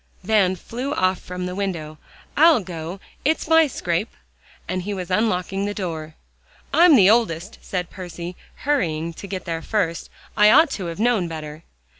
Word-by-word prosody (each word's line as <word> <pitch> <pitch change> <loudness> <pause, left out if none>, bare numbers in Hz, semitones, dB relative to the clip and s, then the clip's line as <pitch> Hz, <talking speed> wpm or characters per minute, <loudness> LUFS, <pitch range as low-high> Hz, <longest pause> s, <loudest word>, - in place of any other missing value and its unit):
Van 195 -2 +3
flew 250 - -5
off 185 0 +1
from 180 0 -6
the 180 - -4
window. 170 -6 -4 0.4
"I'll 315 -4 +6
go; 175 0 -7 0.2
it's 315 +3 +1
my 320 0 +5
scrape," 175 -4 -2 0.6
and 185 0 -2
he 200 +3 -4
was 185 -1 -6
unlocking 195 -1 0
the 205 0 -3
door. 160 -5 -5 0.6
"I'm 340 -2 +7
the 195 -7 +6
oldest," 200 -4 +1
said 180 -2 -4
Percy, 175 -1 -7 0.3
hurrying 170 - 0
to 200 - -9
get 190 -1 -5
there 165 -2 -3
first. 175 -4 -2 0.3
"I 210 -1 +6
ought 315 +6 +6
to 190 -8 -4
have 170 +2 -6
known 225 -6 +2
better." 155 -1 -7
185 Hz, 165 wpm, -22 LUFS, 170-220 Hz, 0.6 s, I'm